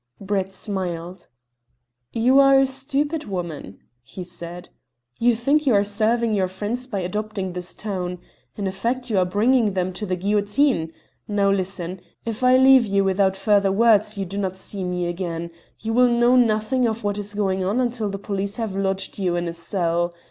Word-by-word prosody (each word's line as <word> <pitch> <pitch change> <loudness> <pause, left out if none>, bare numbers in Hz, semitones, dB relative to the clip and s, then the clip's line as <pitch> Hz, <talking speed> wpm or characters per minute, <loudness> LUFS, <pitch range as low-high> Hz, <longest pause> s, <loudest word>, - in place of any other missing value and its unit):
Brett 195 -1 -2
smiled. 180 -3 -5 0.8
"You 250 +4 +4
are 275 0 +6
a 270 - +4
stupid 280 +4 -2
woman," 170 - -5 0.2
he 180 +9 -9
said. 175 0 -9 0.5
"You 240 0 +4
think 280 +6 +1
you 245 - +5
are 200 - +4
serving 220 +3 +1
your 190 -3 +1
friends 210 +7 -4
by 205 -7 -3
adopting 195 0 -3
this 180 0 -6
tone. 180 -4 -4 0.4
In 205 - -4
effect 235 +6 -2
you 200 - +3
are 180 - +3
bringing 215 +3 +2
them 185 0 -1
to 205 +3 -4
the 185 - 0
guillotine. 205 - +1 0.4
Now 200 -1 +2
listen. 185 -2 -3 0.2
If 230 +1 -4
I 255 0 +6
leave 260 -2 +6
you 200 0 +2
without 190 0 +2
further 200 -1 +3
words 215 0 +3
you 195 - -2
do 195 +3 -5
not 190 -2 -2
see 190 +1 -6
me 180 -1 -2
again. 170 -1 -4 0.3
You 225 +1 -2
will 250 +1 +5
know 240 +1 +4
nothing 240 +1 +2
of 225 0 -3
what 205 0 -1
is 205 0 -6
going 190 -2 0
on 200 +6 0
until 240 -4 -1
the 200 - -4
police 200 0 -3
have 220 -5 -3
lodged 195 0 -2
you 180 -3 0
in 175 0 -1
a 170 - -3
cell. 170 0 -1
200 Hz, 185 wpm, -23 LUFS, 185-230 Hz, 0.8 s, are